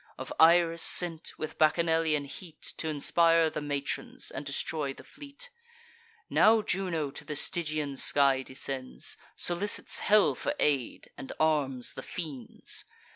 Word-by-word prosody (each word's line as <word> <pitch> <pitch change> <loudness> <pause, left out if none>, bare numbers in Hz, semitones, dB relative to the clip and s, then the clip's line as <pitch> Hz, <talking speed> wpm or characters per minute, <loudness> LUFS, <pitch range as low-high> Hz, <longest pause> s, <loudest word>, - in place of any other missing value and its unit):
Of - - -6
Iris 165 0 +5
sent, 170 -2 +2
with 155 - -6
Bacchanalian 160 -2 +2
heat 160 +3 -8
T' 160 - -3
inspire 165 +2 +3
the 150 - -4
matrons, 145 -1 -4
and 135 - -6
destroy 140 0 -2
the - - -13
fleet? 290 - -11 0.8
Now 220 0 +4
Juno 170 -8 -2
to - - -7
the 150 - -6
Stygian 155 -3 -1
sky 140 -2 +3
descends, 130 0 -5 0.2
Solicits 175 +4 0
hell 210 0 +4
for 290 - -3
aid, 140 -5 -1
and 135 - -7
arms 145 -5 0
the - - -7
fiends. 145 -9 -7
155 Hz, 130 wpm, -29 LUFS, 140-170 Hz, 0.8 s, Iris